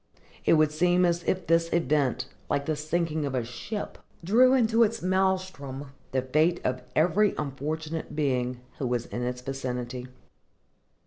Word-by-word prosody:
It - - +5
would 155 -1 +4
seem 180 +3 +3
as 170 0 +1
if 185 -2 0
this 165 0 +2
event, 140 -6 +1 0.2
like 140 0 0
the 155 - 0
sinking 155 +1 -1
of 140 -2 -2
a 125 - 0
ship, 125 - -6 0.2
drew 250 +8 +5
into 230 -2 +3
its 230 0 +2
maëlstrom 185 -7 -1 0.2
the 130 -1 0
fate 155 +6 +2
of 130 0 -1
every 180 +6 +3
unfortunate 150 +2 -4
being 125 -4 0 0.2
who 130 - -1
was 120 -1 -1
in 120 - -5
its 125 0 -3
vicinity. 125 -1 -4
155 Hz, 150 wpm, -27 LUFS, 130-175 Hz, 0.2 s, It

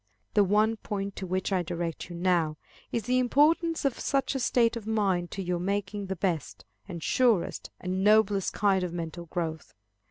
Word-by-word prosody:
The 205 - +5
one 215 +3 +2
point 200 -1 -4
to 190 - -4
which 185 +2 -1
I 185 - +2
direct 170 0 -4
you 175 - -7
now, 170 -3 +1 0.3
is 230 - -1
the 250 +4 +2
importance 305 +6 +3
of 275 - 0
such 275 -1 0
a 270 - -2
state 240 -2 +2
of 225 -2 -6
mind 195 -5 +1
to 195 - -5
your 180 -1 -1
making 200 +2 -2
the 190 - -2
best, 175 -3 -2 0.2
and 170 -4 -7
surest, 235 -8 +1
and 185 +1 -2
noblest 210 -2 +4
kind 195 -2 +2
of 175 -2 -3
mental 170 0 -5
growth. 160 -2 -4
195 Hz, 185 wpm, -28 LUFS, 175-220 Hz, 0.3 s, The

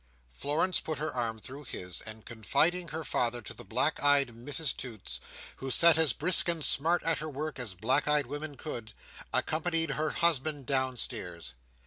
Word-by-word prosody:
Florence 150 - 0
put 155 -2 -4
her 155 +1 -2
arm 115 -3 -1
through 135 +6 -9
his; 90 -8 -6
and 110 0 -7
confiding 165 - +1
her 160 0 -5
father 120 -3 0
to 110 - -8
the 120 - -10
black 125 +9 +1
eyed 145 -2 +4
Mrs 130 +5 -2
Toots, 110 - -6 0.4
who 135 - -5
sat 165 +5 +6
as 160 -2 +4
brisk 175 +3 +3
and 165 -3 +2
smart 165 +5 +3
at 165 -1 +1
her 155 +1 -4
work 150 0 -4
as 110 -6 -2
black 125 +11 +2
eyed 150 -1 +3
woman 145 +2 -6
could, 115 -8 -6 0.4
accompanied 165 0 +1
her 150 +3 0
husband 155 -4 +1
downstairs. 120 - -2
140 Hz, 170 wpm, -30 LUFS, 120-155 Hz, 0.4 s, sat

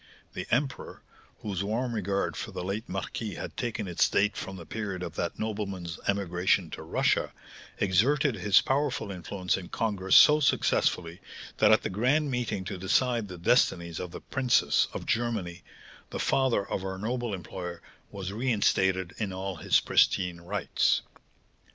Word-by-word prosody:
The - - -5
emperor, 135 +3 -2 0.4
whose 100 -3 -3
warm 120 +4 -1
regard 100 -2 -1
for - - -5
the 90 - -5
late 100 +4 -4
marquis 95 +2 -4
had - - -7
taken 115 -4 -3
its 85 - +2
date 105 +1 +2
from 95 - -6
the 85 -3 -9
period 100 -4 -4
of 85 -3 -5
that 85 0 -3
nobleman's 100 -6 -4
emigration 95 -2 +1
to - - -7
Russia, - - +1 0.5
exerted 130 - +2
his 100 -1 +4
powerful 135 -5 -1
influence 90 0 -2
in 95 -2 -8
congress 100 -5 0
so 150 0 +8
successfully, 90 - +1 0.4
that - - +5
at - - +5
the - - -2
grand 135 +9 +1
meeting 120 -6 -2
to 95 -1 -5
decide 115 +4 +1
the 90 -2 -8
destinies 85 - +2
of 90 - -5
the - - -9
princes 130 -3 +2
of - - -6
Germany, 110 -7 -1 0.5
the - - -5
father 130 -7 +1
of 95 - -3
our 95 0 -4
noble 120 +3 -2
employer 90 -1 -6 0.3
was 95 -1 -6
reinstated 95 -6 +1
in 105 -3 -2
all 95 -1 -4
his - - +3
pristine 90 -3 +2
rights. 100 +4 +1
100 Hz, 155 wpm, -28 LUFS, 90-115 Hz, 0.5 s, so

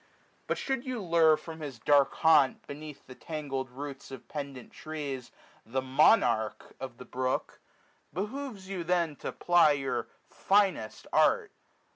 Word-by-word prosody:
But - - 0
should 265 -2 -2
you 255 -3 -3
lure 165 -4 +4
From 160 0 -9
his 145 -5 -6
dark 140 +4 +3
haunt, 155 -5 +4
beneath 150 0 -9
the 130 - -11
tangled 135 -3 -4
roots 140 +2 -8
420 135 - -7
Of 130 - -17
pendant 140 -4 -7
trees, 145 -5 -6 0.3
the 125 +4 -2
monarch 130 - +3
of 130 -3 -7
the 125 - -10
brook. 130 +1 -2 0.5
Behoves 210 - -5
you 190 -3 -4
then 170 -3 +1
to - - -5
ply 175 -4 +4
your 135 -2 -2 0.2
finest 195 - +1
art. - - +3
150 Hz, 145 wpm, -30 LUFS, 135-175 Hz, 0.5 s, lure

